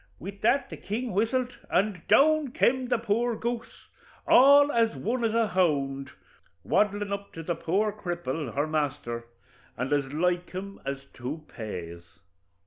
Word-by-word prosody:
With 200 +3 -9
that 245 +4 +2
the - - -6
king 230 +5 -4
whistled, 245 +6 0 0.2
and 195 -1 +1
down 305 -2 +4
kem 260 -4 +2
the 245 - +2
poor 230 +1 0
goose, 235 +1 -5 0.4
all 285 +3 +7
as 230 -3 +2
one 240 +2 -2
as 225 -1 +1
a 230 -2 +2
hound, 140 -7 0 0.6
waddlin' 205 -1 +1
up 200 0 -6
to 165 - -7
the 175 - -1
poor 195 +6 0
cripple, 175 - -4
her 145 +2 +1
masther, 145 -6 -2 0.5
and 130 +4 -1
as 145 -1 +2
like 175 +3 0
him 195 +2 -7
as 140 0 -1 0.2
two 145 +5 -6
pays. 85 -7 -7
200 Hz, 150 wpm, -27 LUFS, 150-235 Hz, 0.6 s, all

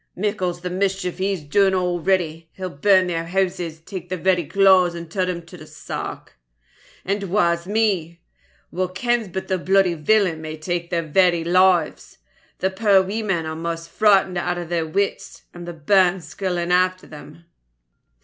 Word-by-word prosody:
Mickle's 185 -3 -2
the 180 0 -4
mischief 190 -1 -2
he 190 +1 0
has 190 -6 -3
dune 190 +6 +2
already. 175 -2 -1
He'll 185 -1 -6
burn 185 +5 +3
their 165 -2 -3
hooses, 180 -3 -2
tak 180 0 -8
their 185 - -2
very 180 -1 +1
claes, 185 -1 +4
and 170 -1 -8
tirl 185 -1 -1
them 175 -2 -4
to 170 - -12
the - - -12
sark. 65 - -7 0.7
And 200 +1 -1
waes 170 -3 +1
me! 195 -6 0 0.5
wha 185 +1 -1
kens 230 +5 -1
but 190 +1 -5
the 185 -1 -1
bluidy 190 0 +3
villain 170 0 +1
might 155 0 -8
tak 175 0 -2
their 170 +1 +2
lives? 185 0 +2 0.4
The 190 - -1
puir 195 -1 +3
weemen 195 -4 -2
are 160 0 -4
maist 165 0 -5
frightened 195 -4 +3
out 175 0 -2
o' 175 - -4
their 165 -1 -2
wits, 200 +5 -3
and 175 0 -9
the 175 - -5
bairns 180 +2 +2
skirling 180 -3 -3
after 185 +1 +2
them. 155 +2 -13
180 Hz, 165 wpm, -21 LUFS, 170-190 Hz, 0.7 s, claes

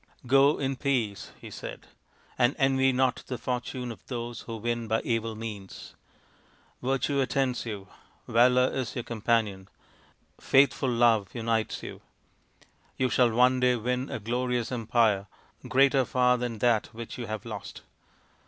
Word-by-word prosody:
" - - -22
Go 135 +4 +5
in 135 -1 -2
peace/' 120 -8 -1
he - - -10
said, - - -8 0.3
" - - -32
and 120 +1 +3
envy 135 -2 +3
not 130 0 +1
the 125 - -4
fortune 125 0 -4
of 115 - -11
those 120 -2 -5
who 115 -1 -6
win 115 +1 -2
by 110 +1 +1
evil 115 -1 -2
means. 105 -3 -8 0.9
Virtue 135 +2 0
attends 130 -2 -1
you, 100 -3 -6 0.4
Valour 125 +2 +4
is 130 -3 -3
your 120 - -3
companion, 110 -4 -1 0.7
Faithful 135 0 +3
Love 115 -5 +3
unites 115 -1 -1
you. - - -8 1.0
You 130 -1 +1
shall 125 -2 +4
one 125 +3 +3
day 125 0 +3
win 125 +3 -2
a - - -3
glorious 120 +2 -2
empire, 115 -4 +1 0.4
greater 135 +1 +4
far 125 -1 +3
than 120 -2 -3
that 115 -1 +2
which 115 +2 -7
you 120 - -5
have 110 -1 -5
lost. - - -8
120 Hz, 150 wpm, -28 LUFS, 115-130 Hz, 1.0 s, Go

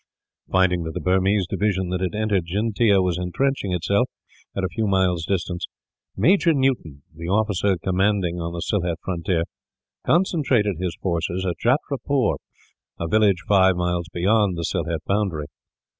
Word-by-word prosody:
Finding 95 -2 +3
that 80 -1 -5
the - - -1
Burmese 95 +1 +2
division 95 0 -1
that 90 0 -2
had 95 +2 -2
entered 105 -5 0
Jyntea 100 +1 +2
was 90 -1 0
intrenching 100 +4 -1
itself, 100 +8 +1 0.5
at 95 - -1
a - - +2
few 110 -1 -2
miles' 95 -4 +1
distance, 90 -2 -2 0.5
Major 165 - +4
Newton, 125 - -1
the 85 +1 -7
officer 100 -1 +1
commanding 95 -1 0
on 85 0 -3
the 85 0 -5
Sylhet 90 -5 -1
frontier, 85 -2 -1 0.6
concentrated 135 - +2
his 90 -2 -3
force 85 -3 0
at 90 0 -2
Jatrapur, 135 0 +1 0.6
a 85 - -2
village 100 -2 +3
five 95 -2 +5
miles 90 -1 -1
beyond 100 +1 +2
the 85 - -3
Sylhet 80 0 -2
boundary. 95 -7 -1
95 Hz, 145 wpm, -23 LUFS, 90-105 Hz, 0.6 s, five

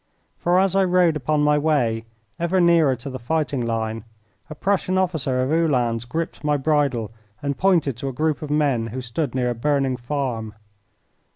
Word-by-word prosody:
For 175 +1 +2
as 195 0 +2
I 195 - +4
rode 180 -3 +3
upon 150 +1 0
my 150 0 +3
way, 125 -8 +1 0.3
ever 170 +2 +1
nearer 170 -6 +4
to 125 +3 -10
the 130 - -6
fighting 140 +1 -1
line, 115 -1 -2 0.5
a 150 - -7
Prussian 190 +2 0
officer 155 -9 0
of 130 - -1
Uhlans 125 -8 +1
gripped 160 +7 -4
my 150 -1 +2
bridle 140 -7 0 0.3
and 140 -1 -2
pointed 170 -9 +2
to 135 - -4
a - - -2
group 155 +4 -1
of 150 - -6
men 140 -6 +1
who 125 +3 -5
stood 125 +2 -3
near 125 -1 +1
a - - -1
burning 135 +1 0
farm. 120 -5 -3
145 Hz, 180 wpm, -22 LUFS, 125-160 Hz, 0.5 s, I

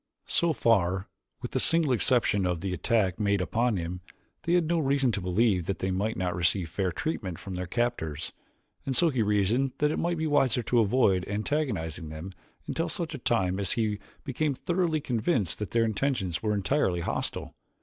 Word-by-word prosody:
So 170 -1 +2
far, 95 - +2 0.4
with - - -4
the - - 0
single 165 -4 +3
exception 115 -5 +2
of 90 -2 -1
the 95 -1 -2
attack 95 +1 +1
made 100 -1 +2
upon 115 +4 +1
him, 90 +1 -4 0.4
they 170 - 0
had 175 -2 +4
no 170 +1 +1
reason 135 -3 +2
to 105 - -3
believe 90 -1 +1
that 100 - -1
they 95 - -2
might 100 +4 -1
not 90 -1 -1
receive 90 0 +1
fair 95 0 -1
treatment 95 - -3
from 95 - -8
their 90 0 -4
captors, 120 -9 -2 0.5
and 135 - -2
so 170 +2 +4
he 130 -4 0
reasoned 105 +6 +1
that 150 +1 +2
it - - -2
might 170 0 0
be 160 - -1
wiser 130 -5 +2
to 120 +1 +2
avoid 105 -4 +3
antagonizing 105 - -2
them 80 +5 -7 0.3
until 165 - -2
such 165 -2 -4
a 145 - -5
time 95 -6 +1
as 100 -3 +1
he 110 -3 0 0.2
became 145 +1 -1
thoroughly 170 0 0
convinced 115 - 0
that 105 - -3
their 115 -1 +2
intentions 105 -6 -1
were 105 -1 0
entirely 100 -4 +1
hostile. - - -2
110 Hz, 190 wpm, -28 LUFS, 90-135 Hz, 0.5 s, had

